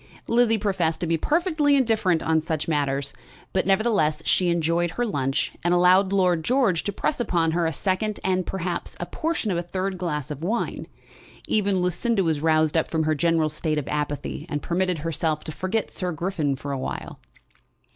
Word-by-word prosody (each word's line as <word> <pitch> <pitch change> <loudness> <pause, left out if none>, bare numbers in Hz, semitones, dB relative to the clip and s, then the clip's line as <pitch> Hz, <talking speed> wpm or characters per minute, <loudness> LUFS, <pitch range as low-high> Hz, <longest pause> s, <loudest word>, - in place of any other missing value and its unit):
Lizzie 230 -1 +3
professed 190 -6 0
to - - +1
be 165 0 +1
perfectly 305 - +2
indifferent 220 -10 +2
on 160 0 +2
such 160 -1 -2
matters; 140 -3 0 0.4
but 190 - +1
nevertheless 195 -7 +2
she 180 -2 +3
enjoyed 170 +1 +1
her 240 +9 -2
lunch, 135 - -1
and 175 +1 +3
allowed 185 +2 +5
Lord 180 -4 +2
George 235 -7 +2
to 205 - 0
press 270 +8 -1
upon 170 -8 +1
her 170 0 +1
a - - 0
second, 195 +6 -1
and 185 -1 +1
perhaps 180 -1 -4
a - - -2
portion 315 -10 -2
of 175 - 0
a - - 0
third 185 +2 -3
glass 150 -5 -3
of 150 0 -6
wine. 220 +7 -2 0.6
Even 200 -3 +1
Lucinda 195 +4 +1
was 160 -3 0
roused 155 -1 +2
up 160 - +2
from 160 -1 0
her 155 0 +2
general 160 +1 +2
state 155 0 -2
of 145 - -2
apathy, 150 +1 -3
and 145 -2 -3
permitted 180 0 0
herself 155 0 -1
to - - -6
forget 185 +7 -2
Sir 180 -1 -2
Griffin 160 -3 -1
for 140 +2 -6
a 135 - -2
while. - - -5
175 Hz, 185 wpm, -24 LUFS, 155-195 Hz, 0.6 s, allowed